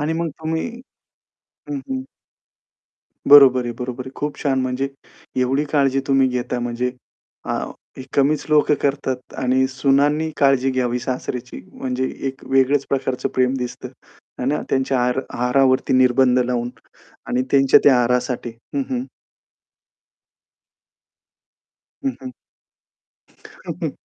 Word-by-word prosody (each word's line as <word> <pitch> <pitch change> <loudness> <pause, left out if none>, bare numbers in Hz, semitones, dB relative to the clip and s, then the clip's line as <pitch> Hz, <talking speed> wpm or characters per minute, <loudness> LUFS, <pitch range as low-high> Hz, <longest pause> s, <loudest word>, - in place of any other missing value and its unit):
आणि 150 +2 0
मग 170 -1 -1
तुम्ही 160 0 -2 1.0
हं, 285 - -2
हं. 265 -1 -5 1.3
बरोबर 135 -3 +8
आहे, 120 - -3
बरोबर 125 0 -5
आहे. - - -7
खूप 145 0 -3
छान. 135 -2 +1
म्हणजे 130 +1 -1 0.5
एवढी 135 +4 +1
काळजी 135 -2 +2
तुम्ही 135 -1 +3
घेता 125 0 -2
म्हणजे 120 +1 -2 0.6
आ - - 0 0.4
ही 130 - -7
कमीच 145 +2 +2
लोकं 150 0 +4
करतात 135 -2 -2
आणि 130 +1 +2
सुनांनी 140 +4 +2
काळजी 135 -1 +3
घ्यावी 125 -1 0
सासऱ्याची 125 0 -5
म्हणजे 130 0 -2 0.2
एक 135 0 -9
वेगळेच 135 +1 +3
प्रकारचं 130 -2 -1
प्रेम 130 0 +2
दिसतं, 125 -1 -5 0.5
आहे 125 - -3
ना. 150 - 0
त्यांच्या 135 -1 +1
आहार 125 +2 +1
आहारावरती 130 +2 +2
निर्बंध 130 0 +4
लावून 120 -1 -1 0.6
आणि 125 - 0
त्यांच्या 135 -1 +6
त्या 135 -3 +6
आहारासाठी 125 0 0 0.2
हं, 280 - +1
हं. 255 -1 -2 3.0
हं, 270 -2 0 1.3
हं. - - -6
130 Hz, 120 wpm, -21 LUFS, 125-140 Hz, 3.0 s, बरोबर